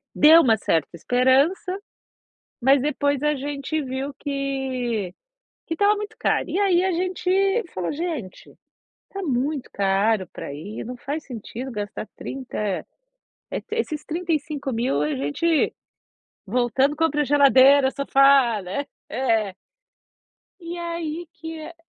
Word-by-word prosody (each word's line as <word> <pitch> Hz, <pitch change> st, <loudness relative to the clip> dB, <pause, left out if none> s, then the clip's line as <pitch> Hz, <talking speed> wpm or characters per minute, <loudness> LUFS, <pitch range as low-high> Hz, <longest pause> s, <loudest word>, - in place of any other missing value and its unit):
deu 320 Hz, +3 st, +8 dB
uma 225 Hz, -7 st, +4 dB
certa 165 Hz, -7 st, 0 dB
esperança, 270 Hz, -, +2 dB, 0.8 s
mas 270 Hz, +1 st, +5 dB
depois 285 Hz, -1 st, 0 dB
a 300 Hz, 0 st, +3 dB
gente 285 Hz, +2 st, -3 dB
viu 265 Hz, +1 st, -4 dB
que, 265 Hz, -8 st, -2 dB, 0.5 s
que -, -, -3 dB
estava 405 Hz, +5 st, +3 dB
muito 420 Hz, +1 st, -6 dB
caro, -, -, +1 dB
e 360 Hz, +6 st, -1 dB
aí 370 Hz, -3 st, +3 dB
a 380 Hz, -, +1 dB
gente 370 Hz, +4 st, +1 dB
falou: 180 Hz, -2 st, -2 dB
"Gente, 300 Hz, -, -5 dB, 0.6 s
tá 390 Hz, -, -6 dB
muito 275 Hz, -1 st, -1 dB
caro 195 Hz, 0 st, +1 dB
pra 140 Hz, -, -6 dB
ir, 185 Hz, +9 st, -7 dB
não 250 Hz, +2 st, -6 dB
faz 290 Hz, +5 st, -4 dB
sentido 250 Hz, +1 st, -7 dB
gastar 205 Hz, -1 st, -5 dB
30, 265 Hz, -1 st, -6 dB, 0.9 s
eh, -, -, -3 dB
esses 315 Hz, -10 st, -2 dB
35.000 295 Hz, -, -1 dB
a 150 Hz, -1 st, 0 dB
gente 215 Hz, -, +1 dB, 0.7 s
voltando, 250 Hz, +6 st, +1 dB
compra 295 Hz, -2 st, +1 dB
geladeira, 275 Hz, -1 st, +6 dB
sofá, 275 Hz, -5 st, +4 dB
né". 195 Hz, +11 st, -3 dB, 0.2 s
É. 225 Hz, -6 st, 0 dB, 1.1 s
E 340 Hz, +1 st, -6 dB
aí 335 Hz, -1 st, -4 dB
que 320 Hz, 0 st, -8 dB
é 310 Hz, +2 st, -9 dB
275 Hz, 125 wpm, -23 LUFS, 240-325 Hz, 1.1 s, deu